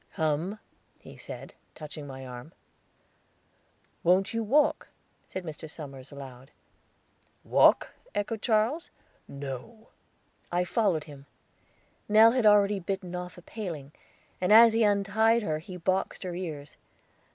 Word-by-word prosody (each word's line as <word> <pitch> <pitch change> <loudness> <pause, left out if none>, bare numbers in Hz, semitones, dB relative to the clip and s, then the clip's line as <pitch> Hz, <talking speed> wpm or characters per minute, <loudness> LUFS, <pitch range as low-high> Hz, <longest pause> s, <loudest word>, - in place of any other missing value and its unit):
"Come," 160 +4 -1 0.4
he - - -14
said, - - -8 0.2
touching 150 -1 -8
my 135 -1 -8
arm. 125 +5 -9 1.5
"Wont 185 +4 +3
you 230 - 0
walk?" 285 +7 +2 0.4
said 185 - -6
Mr. 160 -1 -7
Somers 135 -4 -9
aloud. 135 -2 -10 0.9
"Walk?" - - +4 0.2
echoed 205 +1 -2
Charles. 235 +8 +1 0.4
"No." 140 - -8 0.6
"I 175 +1 +1
followed 180 -5 +1
him. 140 -2 -13 0.8
Nell 220 +2 +7
had 245 -3 +3
already 205 -1 +5
bitten 185 -1 -4
off 180 -1 -6
a 175 - -13
paling; 165 -11 -6 0.5
and 180 - +1
as 225 +1 +9
he 225 - +2
untied 215 +2 +3
her 155 -5 -1
he 180 +3 -9
boxed 185 +3 -1
her 180 -1 -4
ears. 155 -5 -6
180 Hz, 125 wpm, -28 LUFS, 150-215 Hz, 1.5 s, as